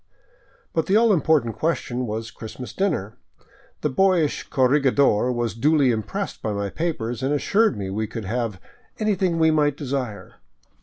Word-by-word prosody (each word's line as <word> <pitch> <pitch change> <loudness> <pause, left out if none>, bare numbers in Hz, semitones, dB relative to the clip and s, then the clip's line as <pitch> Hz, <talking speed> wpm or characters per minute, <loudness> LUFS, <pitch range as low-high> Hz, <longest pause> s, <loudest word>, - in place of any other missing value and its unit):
But 160 -2 0
the 195 - +3
all 225 -1 +5
important 150 - +2
question 125 -6 -1
was 110 +1 -4
Christmas 115 0 -8
dinner. 125 - -2 0.6
The 150 - 0
boyish 180 -1 +2
corregidor 130 -3 +3
was 120 -2 -1
duly 140 +2 +3
impressed 110 -3 -4
by 105 - -2
my 100 -1 -3
papers, 125 -9 -3
and 135 +2 0
assured 200 - +2
me 95 -2 -4
we 110 +2 -2
could 110 -1 -6
have 115 -2 -2 0.2
" - - -34
anything 190 -5 +1
we 160 -1 +4
might 145 -2 +2
desire." 130 -9 -4
130 Hz, 155 wpm, -23 LUFS, 110-160 Hz, 0.6 s, all